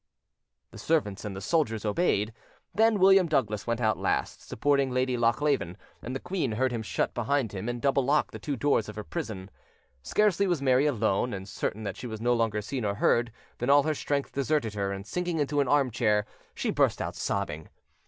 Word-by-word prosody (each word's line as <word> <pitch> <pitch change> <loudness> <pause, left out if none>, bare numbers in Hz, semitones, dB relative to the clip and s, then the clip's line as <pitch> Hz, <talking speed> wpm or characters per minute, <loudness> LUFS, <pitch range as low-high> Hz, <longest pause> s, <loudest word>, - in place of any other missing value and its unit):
The - - -11
servants 120 -12 0
and 100 -2 -5
the 95 - -6
soldiers 115 - 0
obeyed; 105 - +1 0.4
then 225 0 +4
William 190 -1 +6
Douglas 110 -9 0
went 115 0 0
out 110 -2 +1
last, - - -1
supporting 140 +2 +1
Lady 130 0 0
Lochleven, 115 - +1 0.2
and 125 +2 -5
the - - -2
queen 175 - -2
heard 130 +3 +1
him 115 -2 -2
shut 110 - -2
behind 120 -1 0
him 100 +3 -4
and 120 0 -3
double 135 +1 +2
lock 145 +4 +1
the - - -8
two 145 - -3
doors 125 -5 +1
of 105 - -8
her 105 - -5
prison. 105 - -6 0.5
Scarcely 200 - +2
was 175 -4 +1
Mary 135 +1 +3
alone, 115 -3 0
and 95 0 -7
certain 100 +2 -3
that 100 -3 -4
she 125 - -6
was 110 -2 -6
no 120 +2 +2
longer 110 -3 0
seen 130 +3 -4
or 100 -1 -1
heard, 120 +3 +2 0.3
than 120 - -1
all 140 0 +6
her 155 +1 0
strength 145 -1 -2
deserted 140 -5 0
her, 100 -1 -2
and, 100 0 -6
sinking 175 +8 -2
into 145 -1 0
an 140 - +2
arm 140 -2 +3
chair, 105 -2 +1 0.3
she - - -1
burst - - +2
out - - -4
sobbing. 75 +1 -3
125 Hz, 205 wpm, -28 LUFS, 105-145 Hz, 0.5 s, William